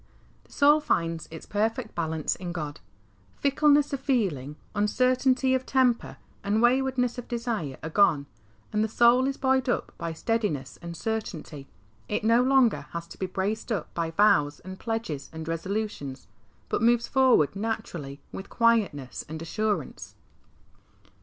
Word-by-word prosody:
The - - -25
soul 295 +2 +5
finds 165 - -1
its 160 - -9
perfect 220 +2 -1
balance 160 -2 -1
in 180 -2 -6
God. 150 - -5 0.6
Fickleness 290 +1 +3
of 275 - -1
feeling, 190 - -1 0.2
uncertainty 255 +5 +2
of 260 0 +1
temper, 255 -3 +1 0.3
and 205 +2 +1
waywardness 250 0 +2
of 245 - -8
desire 230 - -3
are 160 - -3
gone, 155 -7 +4 0.5
and 210 0 +2
the - - +1
soul 240 +4 +4
is 275 - -2
buoyed 265 -1 +1
up - - -1
by 165 - -3
steadiness 160 - -2
and 170 0 -7
certainty. 165 -10 -4 0.4
It - - -1
no 230 +2 +4
longer 260 -3 +3
has 170 0 -4
to - - -12
be 190 - -1
braced 205 +6 -3
up 200 -8 -3
by 165 -1 -1
vows 155 -5 +3
and 185 0 -9
pledges 225 -12 -4
and 160 -1 -7
resolutions, 165 -5 -3 0.4
but - - -1
moves 235 +1 +3
forward 255 - +4
naturally, 190 -10 -4
with 195 - -8
quietness 215 - +1
and 160 +1 -5
assurance. 200 -1 -3
215 Hz, 145 wpm, -27 LUFS, 165-245 Hz, 0.6 s, soul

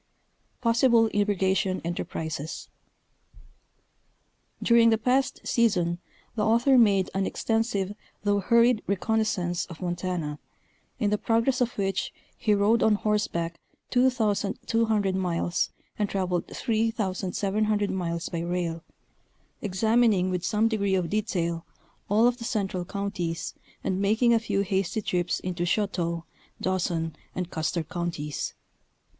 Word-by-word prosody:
PossiBLE 230 -1 +4
IRRIGATION 195 -2 +1
ENTERPRISES. 160 -2 -4 1.9
During 235 -1 +6
the 225 - +4
past 250 +3 +1
season 180 -7 +2 0.3
the 215 - -1
author 235 +5 +4
made 200 -6 +4
an 195 0 0
extensive 225 -4 -1 0.3
though 205 0 +2
hurried 235 +2 +4
reconnoisance 200 -3 0
of 170 -3 -10
Montana, 175 -4 -3 0.6
in 210 -4 0
the 210 - +1
progress 230 +3 +1
of 240 -1 0
which 195 -1 -1 0.2
he 210 -2 +2
rode 210 +3 +3
on 220 -1 +4
horseback 205 -6 -1 0.3
2,200 225 -3 +1
miles 175 -2 0 0.3
and 205 -1 +1
traveled 180 -3 -1
3,700 210 -2 0
miles 170 -2 -2
by 170 - -3
rail, 170 -1 -2 0.8
examining 210 -1 +2
with 180 -1 -2
some 215 +3 +2
degree 200 -4 +1
of 180 -3 -1
detail 175 -6 -1 0.5
all 215 +3 +4
of 245 0 +3
the - - -6
central 200 -6 -2
counties 180 -4 -3 0.3
and 190 0 -1
making 225 +4 +3
a 230 - +4
few 220 -3 0
hasty 195 +1 -1
trips 175 -2 0
into 180 -1 -3
Choteau, 175 -3 0 0.4
Dawson 175 -3 -1 0.2
and 180 -1 -3
Custer 160 +1 -1
Counties. 160 -3 -4
200 Hz, 115 wpm, -27 LUFS, 175-225 Hz, 1.9 s, During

